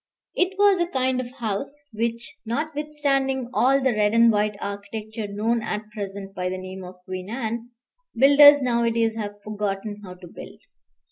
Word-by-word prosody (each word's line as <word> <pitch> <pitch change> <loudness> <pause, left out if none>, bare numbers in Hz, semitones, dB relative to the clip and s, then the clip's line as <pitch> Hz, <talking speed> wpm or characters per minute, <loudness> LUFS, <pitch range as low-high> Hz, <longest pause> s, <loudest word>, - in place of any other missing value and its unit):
It 370 +1 0
was 405 -2 +5
a 345 - +1
kind 260 -4 0
of 245 - -7
house 265 +4 -4
which, 230 +1 -3
notwithstanding 275 -1 -1
all 270 +3 +3
the 265 -1 +2
red 210 0 +1
and 230 0 +6
white 210 0 0
architecture 210 +2 -6
known 220 +3 -1
at 215 0 -5
present 200 -2 -6
by 180 -1 -2
the 185 - -4
name 185 0 -8
of 180 0 -10
Queen 185 0 -6
Anne, 230 0 -4 0.5
builders 285 +3 +8
nowadays 230 -2 +1
have 205 -2 -6
forgotten 205 0 -4
how 180 -2 -9
to 180 0 -13
build. - - -11
225 Hz, 160 wpm, -24 LUFS, 205-265 Hz, 0.5 s, builders